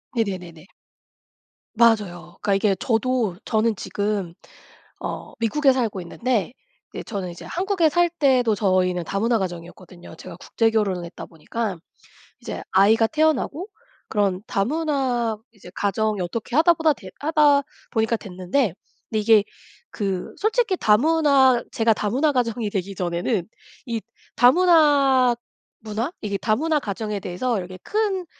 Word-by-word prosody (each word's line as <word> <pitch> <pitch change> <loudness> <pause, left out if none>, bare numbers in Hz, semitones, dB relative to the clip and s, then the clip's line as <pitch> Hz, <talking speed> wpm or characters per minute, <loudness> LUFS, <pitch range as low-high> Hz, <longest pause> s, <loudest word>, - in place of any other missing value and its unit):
네네네네. 185 -7 -4 1.1
맞아요. 200 -7 +1
그러니까 200 - +1
이게 195 0 +2
저도 230 -4 0
저는 220 0 +1
지금 200 -4 -3 0.6
어 - - -6
미국에 270 +5 +3
살고 225 -7 -2
있는데 225 +3 -2 0.4
이제 - - -5
저는 195 -5 -5
이제 170 - -11
한국에 365 -2 +1
살 345 +3 +2
때도 260 -8 +2
저희는 185 -3 +1
다문화 225 +4 0
가정이었거든요. 175 -1 -8
제가 165 - -10
국제결혼을 210 -4 0
했다 170 - -9
보니까. 190 +4 -4 0.7
이제 - - -6
아이가 215 +4 +5
태어나고 315 - 0 0.4
그런 200 -3 0
다문화 255 -2 0 0.2
이제 200 -4 -14
가정이 210 +1 -1
어떻게 215 +7 -4
하다 335 +2 +5
보다 320 -1 +2
되 190 -7 -12
하다 295 -2 +4 0.3
보니까 225 0 +1
됐는데 185 - -2 0.4
근데 220 - 0
이게 215 -1 +5 0.5
그 195 -4 -3
솔직히 435 -2 +1
다문화 270 0 +4
제가 225 -1 +2
다문화 255 +10 0
가정이 235 -4 -1
되기 195 0 -3
전에는 175 +2 -2 0.4
이 230 -2 -2 0.4
다문화 275 -4 +5 0.5
문화? 225 +7 -3
이게 200 -1 -2
다문화 300 - +1
가정에 210 -1 -4
대해서 205 +6 -2
이렇게 185 0 -7
큰 405 -4 -1
225 Hz, 305 characters per minute, -23 LUFS, 195-270 Hz, 1.1 s, 아이가